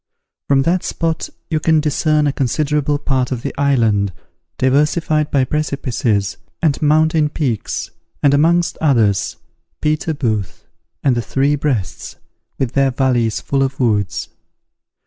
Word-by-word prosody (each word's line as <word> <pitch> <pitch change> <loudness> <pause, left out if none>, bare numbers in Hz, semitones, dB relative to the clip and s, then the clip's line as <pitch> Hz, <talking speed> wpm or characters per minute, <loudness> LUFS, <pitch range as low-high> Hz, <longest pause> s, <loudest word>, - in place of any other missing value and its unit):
From 135 -1 +3
that 175 +4 +1
spot 165 -1 -2 0.2
you 155 - +1
can 160 0 +3
discern 150 0 +1
a 145 - +1
considerable 145 +2 0
part 135 -3 -1
of 125 -2 -3
the - - -3
island, 115 -8 +2 0.5
diversified 150 +3 +1
by 135 -2 +2
precipices 125 -8 -1 0.2
and 155 -4 +1
mountain 155 0 +3
peaks, 130 -8 -3 0.3
and 140 -1 +5
amongst 170 +4 +2
others, 115 - +2 0.4
Peter 155 +1 0
Booth, 110 - -2 0.4
and 130 -3 +3
the 120 - 0
Three 140 +5 +1
Breasts, 135 -10 -3 0.4
with 130 -3 -1
their 135 -1 +2
valleys 125 -4 +1
full 135 -1 -1
of 135 0 -1
woods. 105 -6 0
140 Hz, 130 wpm, -18 LUFS, 125-150 Hz, 0.5 s, and